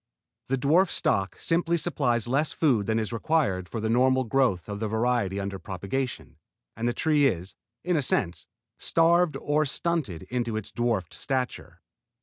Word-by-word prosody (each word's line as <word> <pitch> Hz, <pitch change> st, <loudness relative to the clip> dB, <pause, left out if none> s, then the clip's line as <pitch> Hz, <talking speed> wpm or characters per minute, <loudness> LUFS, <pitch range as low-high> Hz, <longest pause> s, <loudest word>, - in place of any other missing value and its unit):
The 135 Hz, -, 0 dB
dwarf 160 Hz, +8 st, +3 dB
stock 95 Hz, 0 st, 0 dB
simply 170 Hz, 0 st, +1 dB
supplies 125 Hz, -9 st, 0 dB
less 140 Hz, +5 st, +1 dB
food 125 Hz, -11 st, +2 dB
than 110 Hz, 0 st, +1 dB
is 110 Hz, +1 st, -2 dB
required 115 Hz, -, 0 dB
for 115 Hz, -, -4 dB
the 110 Hz, -, -2 dB
normal 130 Hz, +3 st, +3 dB
growth 120 Hz, -7 st, +1 dB
of 100 Hz, -1 st, -5 dB
the 110 Hz, -, -1 dB
variety 110 Hz, -3 st, 0 dB
under 100 Hz, -1 st, -4 dB
propagation, 100 Hz, +8 st, -4 dB, 0.4 s
and 115 Hz, +2 st, -2 dB
the 120 Hz, -, +1 dB
tree 150 Hz, -1 st, +3 dB
is, 90 Hz, -4 st, -3 dB, 0.3 s
in 180 Hz, 0 st, +1 dB
a 150 Hz, -, +2 dB
sense, 90 Hz, -9 st, 0 dB, 0.3 s
starved 170 Hz, 0 st, +3 dB
or 150 Hz, +1 st, +1 dB
stunted 150 Hz, -, -1 dB
into 120 Hz, -3 st, -2 dB
its 110 Hz, -, -6 dB
dwarf 115 Hz, -7 st, -1 dB
stature. 130 Hz, -2 st, -4 dB
125 Hz, 160 wpm, -26 LUFS, 105-150 Hz, 0.4 s, dwarf